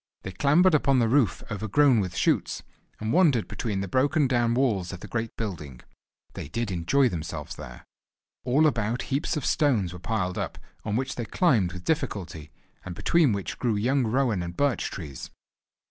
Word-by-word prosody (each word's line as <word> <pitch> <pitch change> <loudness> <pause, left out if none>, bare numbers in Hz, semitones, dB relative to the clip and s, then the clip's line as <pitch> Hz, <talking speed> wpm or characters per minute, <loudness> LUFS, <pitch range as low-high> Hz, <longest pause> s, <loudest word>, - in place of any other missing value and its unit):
They 95 - -5
clambered 155 - +4
upon 140 -3 +3
the 120 -2 +3
roof 120 -5 +2
overgrown 110 +5 +3
with 95 -3 -3
shoots, - - 0 0.4
and 110 +1 -2
wandered 155 - +3
between 105 -5 -3
the 100 - -3
broken 140 - +2
down 120 -2 +1
walls 110 -9 +1
of 90 -1 -8
the - - -8
great 115 -1 -4
building. 80 - -5 0.5
They - - -7
did 115 +6 -3
enjoy 95 +11 +2
themselves 85 -8 -5
there! - - -10 0.6
All 135 +5 +3
about 120 -4 0
heaps 150 +3 0
of 145 - -3
stones 115 - +1
were 90 - -8
piled 90 -2 -2
up, - - -4 0.3
on 105 -1 -2
which 130 +3 -2
they 120 - -3
climbed 110 - +2
with 90 0 -9
difficulty, 95 - -3 0.3
and 90 -2 -7
between 165 - +3
which 100 -2 -4
grew 120 -4 +1
young 130 +7 +1
rowan 120 -5 +1
and 85 0 -6
birch 140 -5 +1
trees. 75 -8 -8
115 Hz, 175 wpm, -26 LUFS, 95-135 Hz, 0.6 s, clambered